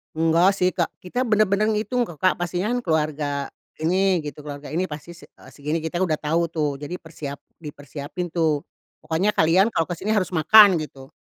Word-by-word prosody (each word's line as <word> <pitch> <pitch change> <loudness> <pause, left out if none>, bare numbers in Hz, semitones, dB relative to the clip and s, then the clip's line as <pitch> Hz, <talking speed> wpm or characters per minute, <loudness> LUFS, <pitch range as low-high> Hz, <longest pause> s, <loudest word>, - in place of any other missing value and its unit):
Enggak 165 +4 +4
sih 180 0 +3
Kak. 170 -3 0
Kita 245 +8 -2
benar-benar 215 -1 +2
ngitung 220 +4 0
kok 170 -10 -9
Kak. 185 - +3
Pastinya 175 +3 -2
kan 245 - 0
keluarga 150 -3 -1 0.3
ini, 185 +2 +2
gitu. 150 -1 -8
Keluarga 145 -1 -8
ini 165 +6 -1
pasti 155 0 -7
se - - -16 0.2
eee, - - -14
segini. 150 +3 -2
Kita 165 +3 -2
udah 155 -4 0
tahu 165 +2 0
tuh 150 -3 0
jadi 150 +6 -6
persiap 150 -3 -8 0.2
dipersiapin 145 +2 -7
tuh. 160 -3 +1 0.4
Pokoknya 165 +6 0
kalian 185 +7 +3
kalau 165 - 0
ke 175 - -3
sini 200 +5 -3
harus 195 -5 +2
makan, 200 +5 +7
gitu. 135 -3 -11
165 Hz, 185 wpm, -23 LUFS, 150-185 Hz, 0.4 s, makan